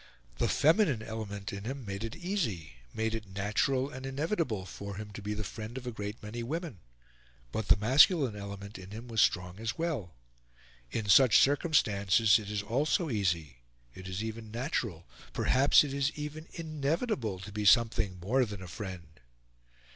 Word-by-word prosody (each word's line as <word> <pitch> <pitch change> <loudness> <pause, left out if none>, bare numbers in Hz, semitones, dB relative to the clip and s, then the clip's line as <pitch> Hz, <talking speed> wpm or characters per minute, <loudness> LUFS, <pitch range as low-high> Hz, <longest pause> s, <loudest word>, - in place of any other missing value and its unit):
The - - +2
feminine 150 - +3
element 105 -3 -5
in 100 0 -6
him 135 +1 -5
made 100 +1 -4
it 115 +4 -5
easy, 115 - -3
made 110 0 -1
it 110 -3 -5
natural 130 +7 0
and 130 -2 -8
inevitable 135 - -1
for 100 +1 -7
him 105 +1 -7
to 105 - -7
be 105 +1 -3
the 110 - -3
friend 110 +4 -7
of 130 - -7
a 125 - -3
great 105 0 -6
many 110 +3 -5
women; 150 - -4 0.7
but 110 - -3
the - - +7
masculine 130 - +5
element 100 0 -7
in 95 0 -10
him 115 +4 -8
was 115 -2 +1
strong 90 +2 +1
as 115 +2 -3
well. 135 - -3 0.7
In 110 - -3
such 115 +3 +7
circumstances 115 - +4
it 105 -2 -8
is 105 -1 -2
also 140 - 0
easy, 85 - -1 0.4
it 95 +4 -10
is 95 +3 -3
even 110 0 -6
natural, 115 - -3 0.3
perhaps 135 +4 +5
it 140 -2 -4
is 140 +1 +1
even 150 +2 -6
inevitable, 155 - -2
to 95 +2 -9
be 105 +1 -3
something 110 -4 +4
more 120 +9 +2
than 105 -5 -5
a - - -8
friend. 90 -5 -8
110 Hz, 170 wpm, -31 LUFS, 100-135 Hz, 0.7 s, the